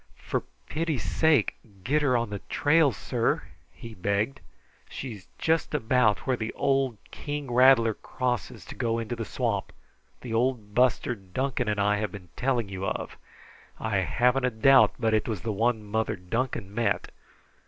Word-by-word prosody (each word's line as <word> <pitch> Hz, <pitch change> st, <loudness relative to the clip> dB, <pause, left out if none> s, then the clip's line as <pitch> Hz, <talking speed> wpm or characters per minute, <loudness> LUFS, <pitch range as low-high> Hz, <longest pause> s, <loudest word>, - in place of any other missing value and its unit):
"For -, -, -2 dB, 0.3 s
pity's 160 Hz, -3 st, -2 dB
sake, 155 Hz, -8 st, +2 dB, 0.3 s
get 150 Hz, +7 st, +2 dB
her 130 Hz, -4 st, +3 dB
on 115 Hz, -3 st, -2 dB
the 100 Hz, -, -3 dB
trail, 150 Hz, -1 st, +4 dB
sir," 105 Hz, -, -1 dB, 0.3 s
he 115 Hz, -1 st, -10 dB
begged. 105 Hz, +8 st, -1 dB, 0.5 s
"She's 110 Hz, -8 st, -7 dB
just 160 Hz, -1 st, 0 dB
about 115 Hz, -4 st, +2 dB
where 130 Hz, -, +2 dB
the 110 Hz, -2 st, -4 dB
old 135 Hz, -4 st, +1 dB
king 145 Hz, -3 st, -5 dB
rattler 125 Hz, -3 st, +6 dB
crosses 125 Hz, 0 st, -3 dB
to -, -, -8 dB
go 115 Hz, -1 st, -1 dB
into 115 Hz, +1 st, -3 dB
the 115 Hz, -1 st, -4 dB
swamp 115 Hz, -6 st, -2 dB, 0.5 s
the 120 Hz, -3 st, -6 dB
old 115 Hz, -3 st, 0 dB
buster 125 Hz, +1 st, +2 dB
Duncan 120 Hz, +5 st, -3 dB
and 105 Hz, -1 st, 0 dB
I 105 Hz, +1 st, +2 dB
have 105 Hz, -2 st, -2 dB
been 90 Hz, -3 st, -10 dB
telling 125 Hz, -4 st, 0 dB
you 95 Hz, -1 st, -6 dB
of. -, -, -3 dB, 0.6 s
I 110 Hz, -3 st, -1 dB
haven't 125 Hz, +7 st, +2 dB
a -, -, +3 dB
doubt 130 Hz, +4 st, +5 dB
but 110 Hz, -1 st, +1 dB
it 110 Hz, -, +1 dB
was 110 Hz, -6 st, -3 dB
the 110 Hz, -, -2 dB
one 110 Hz, +1 st, +1 dB
Mother 110 Hz, +1 st, -1 dB
Duncan 100 Hz, +2 st, -3 dB
met. 115 Hz, +1 st, 0 dB
115 Hz, 165 wpm, -27 LUFS, 105-130 Hz, 0.6 s, rattler